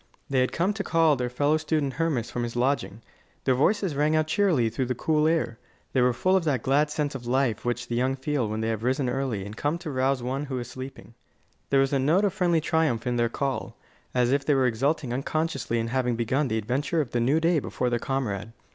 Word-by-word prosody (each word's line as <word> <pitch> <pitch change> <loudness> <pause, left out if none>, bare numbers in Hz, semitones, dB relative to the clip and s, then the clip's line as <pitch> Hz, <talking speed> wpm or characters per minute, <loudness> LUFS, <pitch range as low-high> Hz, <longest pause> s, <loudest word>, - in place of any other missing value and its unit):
They 135 - +3
had 125 - +2
come 185 +5 +1
to 205 -1 -3
call 165 -4 +3
their 125 -1 -2
fellow 145 +5 +2
student 155 -3 -1
Hermas 145 -7 -1
from 120 - -3
his 120 0 -4
lodging. 120 -3 -1 0.4
Their 130 - +3
voices 190 +7 +2
rang 150 +2 +2
out 155 0 +3
cheerily 160 - +2
through 125 +3 -2
the 125 - -1
cool 155 +4 +2
air. 160 -8 0 0.3
They 130 - +3
were 125 0 +4
full 185 +10 +1
of 190 - +2
that 135 -7 0
glad 145 +3 +2
sense 150 -1 -2
of 125 -3 -7
life 125 -3 +1
which 120 0 -2
the 120 - -4
young 130 +2 +1
feel 135 -4 -1
when 110 +1 -3
they 110 - -1
have 110 -2 -2
risen 130 +3 0
early 125 -6 -2
and 105 +1 -8
come 145 +7 -1
to 170 -3 -6
rouse 130 -1 0
one 135 +4 -2
who 135 -2 -4
is 120 - -4
still 130 - -11
sleeping. 130 -2 -9 0.6
There 135 -1 +4
was 135 +1 +1
a 140 - +3
note 160 +10 +3
of 200 - 0
friendly 175 -4 +2
triumph 155 -7 +1
in 125 -1 0
their 120 -1 +2
call, 135 +2 -3 0.3
as 125 -1 +2
if 140 0 +2
they 145 0 +2
were 135 -1 +3
exulting 130 +2 0
unconsciously 155 -2 -1
in 115 0 -1
having 125 -1 0
begun 130 +5 0
the 110 -2 -1
adventure 130 +9 -1
of 140 -6 -1
the 120 - 0
new 135 +7 +3
day 165 0 +3
before 125 -2 -2
their 120 - +1
comrade. 115 -6 -3
135 Hz, 245 wpm, -26 LUFS, 120-155 Hz, 0.6 s, were